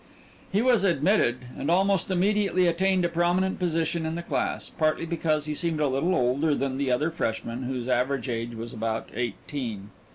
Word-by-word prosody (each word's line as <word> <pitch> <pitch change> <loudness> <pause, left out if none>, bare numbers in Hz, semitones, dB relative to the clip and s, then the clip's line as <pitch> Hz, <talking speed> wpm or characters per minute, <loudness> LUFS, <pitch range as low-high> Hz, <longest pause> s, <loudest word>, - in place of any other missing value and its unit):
He 205 +4 +2
was 245 -6 +4
admitted, 175 - +3 0.2
and 145 - -3
almost 195 +2 +2
immediately 195 0 +2
attained 185 +1 +2
a - - +4
prominent 175 +3 +1
position 165 -1 0
in 160 +1 -2
the 170 - -4
class, - - -2
partly 155 +1 0
because 155 -3 0
he 150 - -2
seemed 165 0 0
a 150 - +2
little 140 +8 +1
older 140 +5 +2
than 135 -1 -2
the 140 -2 0
other 150 +6 +1
freshmen, 115 -5 -3
whose 125 -1 -3
average 125 0 0
age 115 -1 -3
was 115 +1 -6
about 115 0 -3
eighteen. 115 -3 -4
155 Hz, 175 wpm, -26 LUFS, 125-175 Hz, 0.2 s, was